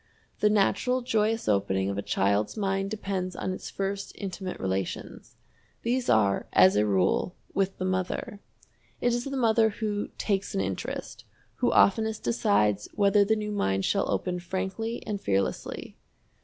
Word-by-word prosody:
The 210 - +4
natural 215 +5 +2
joyous 225 -2 +1
opening 95 -2 +1
of 100 - -2
a 100 - -2
child's 100 - 0
mind 195 -1 0
depends 195 -3 -3
on 185 - -2
its - - -7
first 195 0 -3
intimate 190 -2 -5
relations. 95 -1 -4 0.5
These 245 +1 0
are, 100 -3 +3
as 95 +2 +6
a 105 +1 +3
rule, 95 - +1 0.2
with 195 -1 0
the 185 - -2
mother. 185 +2 -2 0.6
It 245 - +2
is 240 0 -1
the 275 -1 -3
mother 225 -2 +4
who 210 -1 -2
"takes 200 -2 -1
an 95 - +1
interest," 95 -1 -4 0.3
who - - +2
oftenest 220 +2 +3
decides 105 -3 +2
whether 200 0 +4
the 220 +2 +2
new 210 -1 -3
mind 95 - 0
shall 200 - +1
open 180 -1 -1
frankly 190 +6 -4
and 205 -2 -3
fearlessly. 95 -1 -2
195 Hz, 155 wpm, -27 LUFS, -, 0.6 s, as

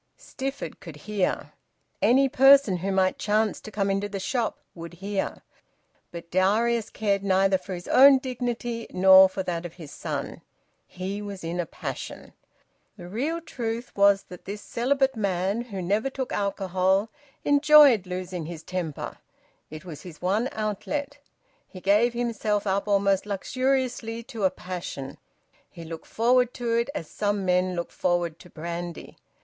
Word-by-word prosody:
Stifford 270 +1 -6
could 165 -5 -10
hear. 195 +4 -2 0.5
Any 270 +3 +5
person 270 -6 +6
who 190 +3 -2
might 190 -1 +1
chance 215 0 +1
to - - -9
come 200 -1 -1
into 200 +1 -1
the 200 -1 -4
shop 235 +4 -1 0.2
would 170 0 -9
hear. 195 +2 -3 0.7
But 170 -1 -9
Darius 215 +5 +2
cared 200 -2 0
neither 190 0 +3
for 190 - -6
his 175 - -9
own 275 +1 +8
dignity 240 -2 -4
nor 190 0 +7
for 190 0 -4
that 170 -2 -3
of 175 -1 -7
his 160 -5 -10
son. - - -5 0.5
He 190 +3 -5
was 200 -3 -7
in 170 +2 -3
a 175 - -1
passion. - - -7 0.6
The 175 -3 -9
real 275 - -2
truth 235 -5 -5
was 200 0 +4
that 180 - -13
this 205 +1 -6
celibate 270 +2 +1
man, 195 +1 0
who 195 -6 -6
never 210 +8 0
took 265 -1 -4
alcohol, 195 0 +1 0.4
enjoyed 285 -8 +6
losing 180 -2 -5
his 165 -2 -8
temper; 175 -5 -5 0.5
it 155 +3 -9
was 155 -5 -8
his 175 -4 -11
one 205 +8 0
outlet; 280 +7 -3 0.5
he 185 - -11
gave 210 +6 +3
himself 220 -3 -1
up 195 +1 0
almost 200 -1 +2
luxuriously 245 +1 -1
to 230 -5 -3
a - - +5
passion; 175 -8 -7 0.5
he 170 - -11
looked 165 0 -8
forward 245 +2 +2
to 235 -2 -2
it 235 +3 +1
as 165 - -4
some 205 +1 -1
men 180 0 +2
look 170 0 -4
forward 175 -2 -1
to 180 - -15
brandy. 170 +1 -6
200 Hz, 155 wpm, -26 LUFS, 180-235 Hz, 0.7 s, own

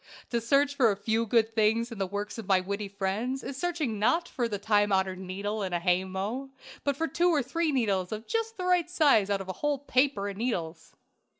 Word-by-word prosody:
To 235 -1 0
search 280 +5 +3
for 260 -5 +4
a - - -1
few 225 +2 0
good 225 0 +2
things 225 +2 +2
in 225 - -7
the 195 - 0
works 205 +3 -4
of 215 - -7
my 190 -2 +4
witty 200 +2 -3
friends 200 +7 -2
is 275 - -5
searching 305 - -2
not 330 +11 +2
for 245 -7 -2
the 210 -3 -3
time 205 0 +2
honored 190 -1 +1
needle 200 +3 -4
in 190 -2 -3
a 175 - +1
hay 180 +1 +2
mow, 205 +9 -4 0.3
but 280 -1 0
for 325 - 0
two 345 +5 +2
or 305 -5 +2
three 320 +5 0
needles 200 -9 0
of 215 +1 -5
just 455 0 -2
the 365 - -3
right 355 -2 +2
size 285 - +4
out 200 -1 0
of 190 - -8
a 185 - -3
whole 295 -1 +1
paper 260 -6 +1
of 200 -1 -5
needles. 170 -9 -3
220 Hz, 230 wpm, -28 LUFS, 195-275 Hz, 0.3 s, for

